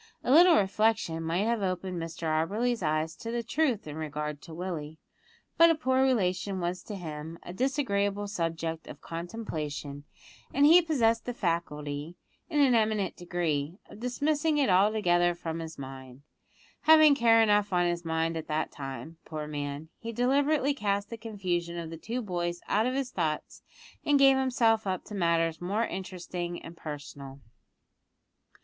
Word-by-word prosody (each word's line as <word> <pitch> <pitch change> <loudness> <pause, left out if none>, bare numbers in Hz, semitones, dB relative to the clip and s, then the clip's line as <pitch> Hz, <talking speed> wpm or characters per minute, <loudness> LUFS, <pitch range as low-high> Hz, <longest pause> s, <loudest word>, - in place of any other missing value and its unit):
A - - 0
little 340 +4 +8
reflection 205 -4 +1
might 170 +5 0
have 230 -1 0
opened 185 -2 -2
Mr 165 0 -7
Auberly's 205 +10 0
eyes 155 0 0
to 230 - -7
the 235 0 -2
truth 250 -2 0
in 150 0 -7
regard 150 -1 -4
to 165 - -12
Willie, 160 -4 -5 0.6
but 335 0 +9
a 330 - +4
poor 260 -4 +1
relation 195 -6 +1
was 180 +1 -2
to 210 - -6
him 160 -2 -7
a 175 - -8
disagreeable 205 -5 0
subject 165 -4 -3
of - - -9
contemplation, 155 -6 -5 0.5
and 280 +1 +5
he 335 +4 +8
possessed 230 -9 +1
the 245 - -4
faculty, 155 -4 -3 0.3
in 300 -3 0
an 265 -3 +5
eminent 215 -4 +1
degree, 170 -3 -2
of - - -11
dismissing 295 +5 0
it 275 -9 +3
altogether 180 -3 +3
from 165 -1 -5
his 160 -1 -7
mind. 130 -1 -9 0.6
Having 310 -1 +8
care 230 -4 +5
enough 205 -1 +3
on 175 -1 +2
his 175 0 -1
mind 165 0 -1
at 160 - -5
that 155 +1 -1
time, 140 +4 -7
poor 155 -1 -5
man, 145 +1 -5
he 230 - -5
deliberately 280 +4 +2
cast 205 -5 -1
the - - -3
confusion 180 -6 -3
of 165 -1 -5
the - - -5
two 235 +9 -4
boys 175 -3 -2
out 215 +3 +2
of 255 - -1
his 270 -2 -2
thoughts, 155 -4 -3 0.4
and 290 -1 +4
gave 270 -1 +6
himself 230 -5 +2
up 185 -1 -2
to - - -10
matters 165 -3 +1
more 205 +6 0
interesting 180 -2 -5
and 165 - -9
personal. 145 -3 -8
185 Hz, 165 wpm, -29 LUFS, 160-230 Hz, 0.6 s, but